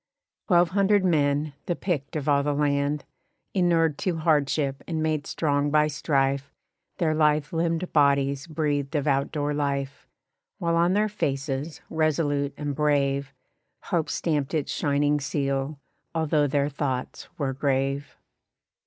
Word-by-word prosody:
Twelve 175 -3 +4
hundred 200 0 +3
men, 145 -3 +1
the 175 - 0
picked 155 -7 -3
of 150 -1 -3
all 140 -1 +4
the 145 0 0
land, 140 0 0 0.5
Innured 165 -5 +2
to 180 -3 -1
hardship 145 -3 +1
and 160 -2 -1
made 155 -2 -1
strong 145 -2 0
by 150 +1 +4
strife 140 -2 0 0.5
Their 165 -4 +1
lithe 150 -1 +2
limbed 165 +1 -1
bodies 140 -1 +2
breathed 150 -2 -1
of 145 - 0
out 140 -1 +1
door 150 -1 -1
life; 140 -1 -2 0.5
While 170 -3 0
on 170 +2 +3
their 210 +2 +2
faces, 140 -5 -3
resolute 145 -3 0
and 145 -1 -3
brave, 140 -2 +1 0.5
Hope 170 -5 -1
stamped 150 -2 -1
its 150 -3 -1
shining 145 0 +1
seal, 140 +1 -2 0.4
although 155 -2 +2
their 140 +1 +1
thoughts 135 -3 -3
were 140 -4 -1
grave. 135 +1 -1
145 Hz, 135 wpm, -26 LUFS, 140-160 Hz, 0.5 s, Twelve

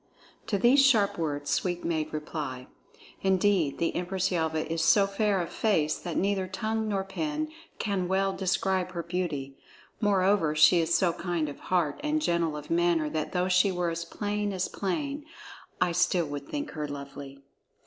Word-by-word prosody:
To 205 - +1
these 255 +7 +5
sharp 220 -9 +3
words 145 -3 -2
Sweep 175 -1 -1
made 160 -2 -1
reply: 150 -4 -5 0.6
"Indeed, 190 -5 +2
the 165 - -1
Empress 185 +1 -1
Yelva 160 -2 0
is 165 0 -1
so 200 +4 +5
fair 200 0 +1
of 170 - -3
face 160 -9 +1
that 175 -3 -4
neither 195 -1 +1
tongue 220 +3 -2
nor 200 -2 0
pen 300 +10 -3 0.3
can 195 -4 -1
well 195 +1 +1
describe 185 -1 0
her 170 -1 -3
beauty. 160 -6 -3 0.4
Moreover, 195 -6 +2
she 155 +3 +6
is 165 0 0
so 175 -1 +2
kind 170 -3 -2
of 145 - -8
heart 170 -6 0
and 300 +1 +1
gentle 170 - 0
of 150 +1 -9
manner 165 -3 +2
that 155 -1 -2
though 180 0 0
she 185 +2 +4
were 175 -2 -1
as 165 0 -3
plain 205 +2 -2
as 185 -1 -1
plain, 280 +9 -3 0.6
I 175 - +2
still 180 0 +2
would 145 -1 -6
think 295 0 -4
her 150 -2 -4
lovely!" 140 -1 -8
180 Hz, 170 wpm, -28 LUFS, 160-200 Hz, 0.6 s, she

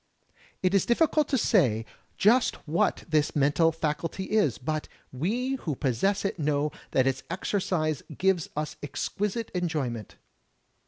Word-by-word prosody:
It 185 +1 +2
is 195 - +3
difficult 300 +3 +3
to 270 - +1
say 130 - +3 0.3
just 235 +5 +4
what 160 +3 +1
this 155 -3 +1
mental 150 +3 +3
faculty 165 +4 -3
is, 205 - +2
but 155 +4 -3 0.2
we 235 - -1
who 155 - -3
possess 145 - 0
it 195 - -2
know 150 0 +1 0.2
that 130 - +2
its 135 0 0
exercise 170 -4 -1 0.2
gives 190 -3 +1
us 150 0 -3
exquisite 210 +9 -3
enjoyment. 150 - -2
165 Hz, 130 wpm, -27 LUFS, 145-200 Hz, 0.3 s, just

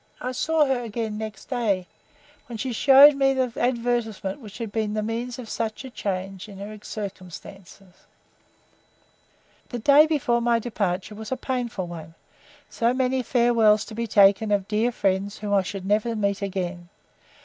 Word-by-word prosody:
I 250 - -3
saw 315 +4 +2
her 265 -3 0
again 220 -2 -4
next 215 -3 -7
day, 215 -8 -1 0.6
when 235 -2 -7
she 250 +3 -3
showed 275 +4 +8
me 270 -1 +2
the 255 -2 0
advertisement 235 -4 -1
which 210 -4 -11
had 230 -4 -5
been 215 -1 -2
the 215 - -1
means 235 +3 -4
of 250 -3 -8
such 225 +3 -4
a 260 - -9
change 195 -1 -4
in 200 - -11
her 205 +2 -7
circumstances. 195 -2 -9 1.8
The 245 - -4
day 285 +6 +6
before 245 -6 +1
my 235 0 +3
departure 205 -4 -2
was 220 +2 -8
a 260 - -1
painful 245 -7 -3
one, 165 -2 -9 0.5
so 235 +2 0
many 260 0 +1
farewells 230 -3 +3
to - - -10
be 230 +1 -3
taken 200 +1 +4
of 200 -2 +1
dear 220 +3 +1
friends 195 -1 -1
whom 205 -1 -3
I 200 - +4
should 190 0 -6
never 215 +3 +1
meet 200 -2 -1
again. 180 -3 -4
220 Hz, 165 wpm, -24 LUFS, 200-245 Hz, 1.8 s, showed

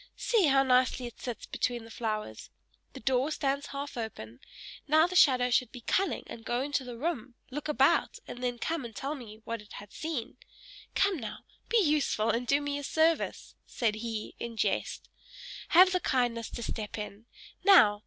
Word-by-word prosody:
"See, 430 -9 +3
how 270 -1 +5
nicely 255 -1 +3
it 240 - -9
sits 245 -3 -5
between 240 -2 -2
the 225 - -12
flowers. 215 - -4 0.4
The - - -8
door 260 +4 +2
stands 280 -1 -1
half 280 +1 -6
open: 120 - -6 0.5
now 310 +2 +5
the 360 +1 -4
shadow 255 -6 +5
should 245 -1 +2
be 245 - -9
cunning, 390 +11 0
and 225 - -9
go 240 +2 -1
into 285 -1 -1
the 245 -2 -8
room, 260 -4 -3 0.2
look 295 +3 -4
about, 300 +2 +3
and 245 - -8
then 245 -1 -1
come 325 +4 -2
and 230 -3 -8
tell 275 +9 -3
me 225 -6 -10
what 230 -1 -4
it 210 - -15
had 205 0 -10
seen. 310 -8 -4 0.6
Come, 395 -2 +3
now! 225 - -7 0.2
Be 470 - +3
useful, 295 - +2
and 240 +1 -2
do 280 +3 +3
me 285 0 -2
a - - -7
service," 320 +3 +1
said 230 -4 0
he, 220 0 -5
in 235 -1 -6
jest. - - -1 0.6
"Have 365 +2 +7
the 365 - +2
kindness 240 -6 0
to 235 - -6
step 215 -1 -4
in. 210 +1 -7 0.4
Now! 350 - +7
250 Hz, 185 wpm, -30 LUFS, 230-295 Hz, 0.6 s, Have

